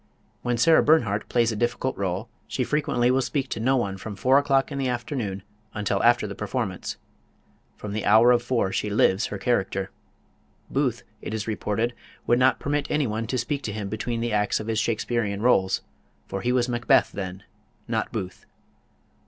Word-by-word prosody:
When 120 -1 -1
Sarah 160 +7 +5
Bernhardt 115 -10 +2
plays 120 -1 +2
a - - -3
difficult 120 +3 -1
role 95 +3 -2 0.2
she 130 - -1
frequently 125 -3 +1
will 130 +1 +2
speak 135 0 -2
to - - -3
no 130 +4 +2
one 100 -6 -2
from 105 +1 -7
four 130 +8 +4
o'clock 140 0 +1
in 140 - -3
the 135 - 0
afternoon 120 -6 -3 0.3
until 105 -2 0
after 120 -1 +4
the 100 - -5
performance. 105 -1 -3 0.8
From 105 -1 -6
the 110 - -2
hour 110 +4 +6
of 120 -1 +4
four 120 -5 0
she 105 - -1
lives 100 0 +2
her 100 - -5
character. 95 -3 -1 0.8
Booth, 130 -4 0 0.2
it 110 - -4
is 110 -1 -3
reported, 110 +2 -1 0.3
would 120 +1 +3
not 130 +1 +4
permit 145 0 -1
anyone 115 -7 -1
to 130 - -1
speak 140 +4 -2
to 115 - -4
him 105 -2 -4
between 115 +2 -3
the 120 -1 -1
acts 105 -1 +1
of 110 - -5
his 110 -1 0
Shakesperean 115 -2 -1
rôles, 95 -6 +3 0.4
for 95 - -5
he 125 - 0
was 125 -1 +2
Macbeth 120 -1 +3
then 95 -1 -6 0.4
not - - -1
Booth. 90 -1 -6
115 Hz, 185 wpm, -25 LUFS, 105-125 Hz, 0.8 s, hour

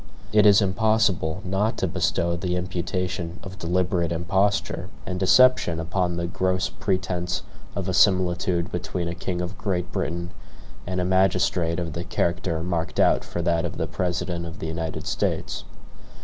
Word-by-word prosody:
It 105 -1 +6
is 100 0 +7
impossible 100 -3 +1
not 105 +5 0
to 95 - 0
bestow 85 +1 0
the 90 +1 -2
imputation 90 0 -3
of 95 0 -9
deliberate 90 -1 0
imposture 95 +5 0 0.2
and 90 -1 -3
deception 95 -4 +5
upon 85 +1 -1
the 85 - -1
gross 95 +1 0
pretense 90 -2 -2 0.3
of 100 -2 -3
a 95 - 0
similitude 90 -2 +2
between 90 0 -3
a 85 - -2
king 90 0 -3
of 90 +2 -5
Great 90 -3 -2
Britain 85 +1 -3 0.6
and 90 0 -1
a 90 - +1
magistrate 90 -2 +2
of 85 -3 -3
the 85 - -3
character 85 -2 -1
marked 85 -2 -2
out - - +4
for 85 - -4
that 85 -1 +2
of 85 - -4
the - - 0
President 85 -1 -2
of 80 - -8
the - - -5
United 80 0 -4
States. - - -2
90 Hz, 160 wpm, -25 LUFS, 85-95 Hz, 0.6 s, is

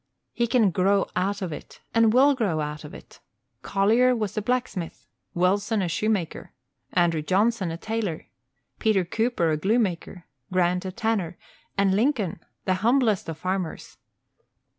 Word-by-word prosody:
He 235 -1 0
can 230 -4 +3
grow 195 +3 +2
out 200 +2 -1
of 175 -4 -3
it, - - -10
and 230 -1 +5
will 270 +5 +5
grow 205 - 0
out 150 0 -4
of 150 - -9
it. - - -13 0.4
Collier 225 +6 +3
was 215 -4 -3
a 215 - 0
blacksmith, 215 -7 -3 0.3
Wilson 200 +4 +1
a - - 0
shoemaker, 190 0 -2 0.4
Andrew 170 -3 +2
Johnson 195 +3 +1
a 165 - -4
tailor, 215 -4 -3 0.5
Peter 210 -5 +2
Cooper 220 -3 0
a 155 - +1
glue 205 +9 +1
maker, 180 -4 -2 0.3
Grant 180 0 +1
a 190 - -3
tanner, 195 -4 -1 0.4
and 200 -1 +3
Lincoln 215 - +1 0.3
the 185 - +2
humblest 230 -5 +2
of 160 - -5
farmers. 185 0 -4
195 Hz, 150 wpm, -25 LUFS, 175-225 Hz, 0.5 s, and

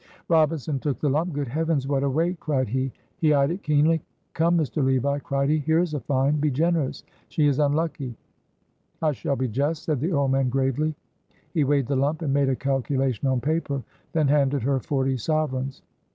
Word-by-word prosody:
Robinson 155 -3 +2
took 140 -1 -2
the 145 - +1
lump. 160 +6 0
"Good 145 -2 -3
heavens! 155 -1 0
what 140 -1 +1
a 140 - +1
weight!" 165 +5 0
cried 135 -4 0
he. 130 +2 -1 0.3
He 155 -5 +3
eyed 140 +2 +3
it 185 +3 -4
keenly. 150 +2 +3 0.3
"Come, 170 +1 +2
Mr. 155 -2 0
Levi," 135 +2 +1
cried 140 -1 -1
he, 155 +1 +3
"here 160 +2 +1
is 170 -2 +1
a 150 - -1
find; 140 +2 +1
be 150 - +2
generous. 155 0 0 0.3
She 155 - +1
is 145 -1 +2
unlucky." 145 -3 0 0.9
"I 155 - +3
shall 140 0 -2
be 130 0 -1
just," 145 +7 -1
said 150 -5 -1
the 160 +8 -1
old 140 -4 +1
man 135 -1 +2
gravely. 135 +4 0 0.6
He 160 -4 +2
weighed 140 -1 +2
the 140 - -1
lump 145 +5 0
and 140 -3 0
made 140 -1 +3
a 130 - +1
calculation 135 -2 -1
on 130 -2 +1
paper, 145 -1 -1 0.3
then 155 -3 +2
handed 140 -2 +2
her 135 +1 +1
forty 135 0 0
sovereigns. 135 -1 -2
140 Hz, 195 wpm, -25 LUFS, 135-155 Hz, 0.9 s, He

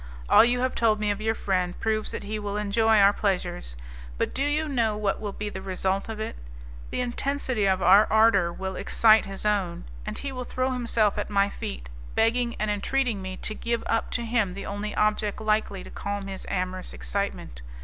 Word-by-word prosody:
All - - +8
you 245 +1 +2
have 255 0 0
told 220 -2 +2
me 210 -1 +1
of 205 +1 -4
your 220 +1 0
friend 185 -4 -1
proves 215 -1 0
that - - -5
he 215 +1 -4
will 205 0 -3
enjoy 220 +2 +3
our 200 0 +6
pleasures. 180 - -2 0.4
But - - -1
do 270 - -2
you 300 +2 0
know 230 -7 +1
what 210 -1 -1
will 205 -2 -3
be 210 +1 -5
the 190 -2 -5
result 190 +2 -1
of 220 -1 -5
it? 220 - -4 0.5
The - - -2
intensity 250 -3 -1
of 190 -1 +1
our 195 +4 +7
ardour 215 -5 +4
will 190 +2 -5
excite 220 +2 +4
his 195 +1 -6
own, 200 - 0 0.2
and - - -5
he 280 - -4
will 255 -1 -5
throw 255 +1 -1
himself 230 -4 +1
at - - -3
my 200 -1 +2
feet, 65 - -6 0.3
begging 235 +1 +2
and 215 0 -1
entreating 230 +1 0
me 185 0 -6
to - - -2
give 235 +1 -2
up 225 - 0
to 240 - -4
him 225 -6 0
the 200 - -6
only 205 +1 -4
object 210 -1 +1
likely 215 -3 0
to - - -11
calm 200 -1 -4
his 195 -1 -7
amorous 185 - -3
excitement. - - -4
210 Hz, 205 wpm, -26 LUFS, 195-225 Hz, 0.5 s, All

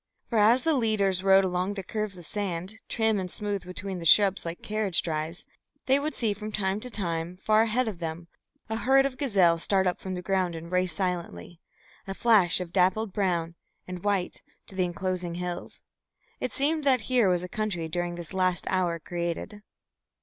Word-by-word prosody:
For 230 - +2
as 230 +5 +5
the 325 - +3
leaders 205 -7 +1
rode 195 0 +6
along 185 +2 -1
the 195 - -5
curves 210 0 -3
of 175 - -10
sand, 190 -1 -3 0.2
trim 220 -3 +1
and 185 -1 -4
smooth 205 0 -3
between 185 +1 -5
the 165 - -7
shrubs 195 +3 +5
like 165 +1 -6
carriage 210 -4 0
drives, 160 +1 -3 0.4
they 265 +1 +4
would 300 0 -3
see 220 -4 +1
from 210 +1 -7
time 195 -1 -1
to 250 - -3
time, 175 -5 -3
far 215 +3 +3
ahead 230 +2 +1
of 200 -6 -4
them, 165 0 -5 0.4
a 220 0 -2
herd 270 +3 +4
of 275 -2 -2
gazelle 190 - +3
start 190 +2 +1
up 180 - 0
from 190 -1 -5
the 180 - -6
ground 185 -2 0
and 165 +1 -8
race 180 0 +2
silently, 175 - -4 0.5
a 195 - -4
flash 200 -8 +4
of 180 -1 -6
dappled 190 +2 +2
brown 175 -4 0 0.3
and 180 -1 -7
white, 200 -3 -1 0.2
to - - -7
the 185 -1 +1
enclosing 180 -1 -3
hills. 180 0 -5 0.6
It - - -2
seemed 300 +3 0
that 260 -4 +3
here 240 -2 +3
was 180 -1 +1
a - - -4
country 185 -4 -2
during 175 +1 -3
this 175 +1 -5
last 185 -1 +1
hour 180 -3 +1
created. 175 +5 -4
190 Hz, 195 wpm, -27 LUFS, 175-215 Hz, 0.6 s, rode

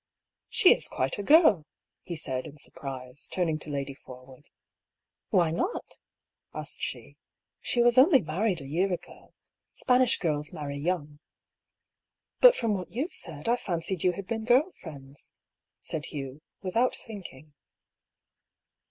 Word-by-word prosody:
^' - - -63 0.5
She - - +7
is - - -2
quite 130 +8 -1
a - - 0
girl! 205 - +5 0.2
" - - -61
he 170 - -2
said, 130 -5 -2
in 150 - -12
surprise, 135 -1 -6
turning 165 -4 0
to 155 - -4
Lady 140 -1 -3
Forwood. 130 +2 -14 0.8
"Why 175 -6 +3
not?" 355 - -3 0.6
asked - - -3
she. - - -5 0.4
"She 240 - +2
was 240 +1 +5
only 275 +1 +7
married 180 +3 0
a - - -9
year 180 +7 0
ago. 180 0 -8 0.4
Spanish 250 -1 +4
girls 150 -3 -1
marry 145 -5 -5
young." 150 -2 -3 0.6
" - - -61
But, - - +9
from 230 -3 0
what 185 -3 -4
you 275 +10 -2
said, 155 -1 -4
I 235 - +4
fancied 175 -3 -2
you 180 - +3
had 200 +2 -7
been 225 +2 -3
girl 255 +10 +3
friends," 140 -4 -9 0.5
said 155 -1 -3
Hugh, 140 -1 -7 0.2
without 230 +7 +1
thinking. 160 - -11
170 Hz, 150 wpm, -28 LUFS, 145-220 Hz, 0.8 s, But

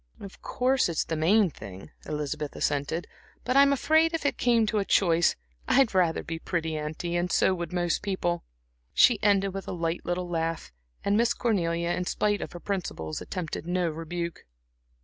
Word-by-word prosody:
"Of 195 -1 -11
course, 255 -4 +1
it's 165 - 0
the 165 - -2
main 180 +4 +3
thing," 95 -6 -10 0.2
Elizabeth 150 -1 -3
assented, 145 +4 -1 0.4
"but 255 - -1
I'm 280 0 +7
afraid 315 +4 +3
if 325 - -4
it 285 - +2
came 235 -2 +3
to 215 0 0
a - - +1
choice, 170 -4 +3 0.3
I'd 260 -5 +4
rather 180 -3 +2
be 165 0 -5
pretty, 160 -2 -2
auntie, 155 +3 -3
and 175 0 0
so 190 - +3
would 170 -3 -4
most 175 -1 0
people." 180 -4 -1 0.5
She 240 -4 +5
ended 195 -2 +2
with 195 -1 -6
a - - -3
light 170 -1 -2
little 175 +1 -2
laugh, 165 -1 -2 0.3
and 200 - +2
Miss 235 +1 +2
Cornelia, 170 -7 0
in 180 - -1
spite 205 +2 0
of - - -6
her 175 - -7
principles, 170 - -4
attempted 170 -2 -5
no 180 -1 +1
rebuke. 170 +1 -5
175 Hz, 180 wpm, -27 LUFS, 165-205 Hz, 0.5 s, I'm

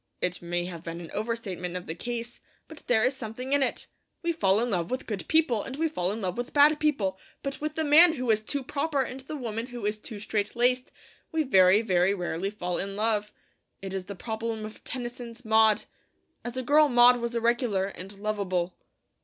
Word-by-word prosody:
It 180 0 -1
may 175 0 -2
have 175 -2 -7
been 170 0 -6
an 170 -2 -9
over 225 +3 -1
statement 180 -5 -5
of 180 - -8
the 160 - -4
case; 240 +4 -5 0.3
but 315 -1 -11
there 220 -3 +4
is 260 +1 +1
something 250 +2 -5
in 285 - +4
it. 265 - 0 0.4
We 340 - +1
fall 200 - +2
in 240 +1 0
love 175 -3 -1
with 255 - -3
good 195 -7 -5
people, 310 -9 +3
and 265 - -6
we 325 +3 +1
fall 185 - -1
in 220 +2 -4
love 185 +3 -2
with 245 - -4
bad 295 +1 +6
people; 220 -12 0 0.2
but 275 0 -4
with 305 0 -3
the 320 - 0
man 315 +3 +7
who 255 -6 0
is 215 0 +2
'too 275 +5 -3
proper,' 280 +1 0
and 255 +1 -6
the 270 +3 -7
woman 230 -3 -4
who 240 -4 -6
is 210 +1 -1
'too 215 -1 -7
straight 205 +1 -2
laced,' 250 +1 +2 0.4
we 320 -1 +1
very, 195 -4 +5
very 185 -1 +2
rarely 180 0 -2
fall 180 -4 -3
in 195 0 -3
love. 210 -1 0 0.5
It 195 -1 -6
is 190 -1 -3
the 200 - -7
problem 220 +2 -4
of 215 - -10
Tennyson's 240 -1 -7
'Maud.' 220 -1 +4 0.6
As 240 +1 -5
a 255 - -2
girl 295 +3 +5
Maud 245 0 +7
was 235 0 -3
irregular 235 -4 +1
and 195 -1 -8
lovable. 195 -4 -2
225 Hz, 215 wpm, -27 LUFS, 195-255 Hz, 0.6 s, man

